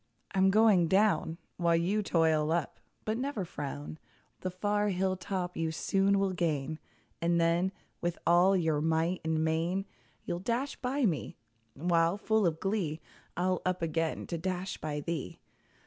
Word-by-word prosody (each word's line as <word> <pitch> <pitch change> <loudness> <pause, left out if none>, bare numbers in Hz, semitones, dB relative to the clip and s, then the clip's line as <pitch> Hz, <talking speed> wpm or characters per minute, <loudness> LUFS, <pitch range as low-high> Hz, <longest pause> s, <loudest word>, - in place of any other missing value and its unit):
I'm 190 0 +4
going 205 -4 +5
down, 190 -3 +2 0.2
While 170 -1 +3
you 185 +6 +1
toil 160 -5 +2
up; 165 -3 -1 0.3
but 220 +2 -1
never 255 -8 -2
frown; 145 -1 -6 0.4
The 185 - -3
far 205 +3 0
hill 190 0 0
top 180 -1 -3
you 165 -1 -1
soon 195 +4 +2
will 195 -1 +1
gain, 155 -3 -1 0.4
And 170 0 +2
then, 170 +3 +2 0.3
with 175 0 -1
all 180 +3 +5
your 160 -4 +1
might 165 +3 +1
and 160 0 0
main, 170 +5 0 0.4
You'll 175 - -2
dash 240 +8 -1
by 265 +1 0
me; 160 - -1 0.4
while, 170 +3 +2
full 220 -1 +2
of 160 -1 -1
glee, 190 -6 -1 0.4
I'll 185 0 +1
up 185 -1 -1
again 165 0 -1
to 170 - -4
dash 185 +2 -3
by 150 -1 -3
thee! 165 -1 -4
175 Hz, 155 wpm, -31 LUFS, 160-195 Hz, 0.4 s, going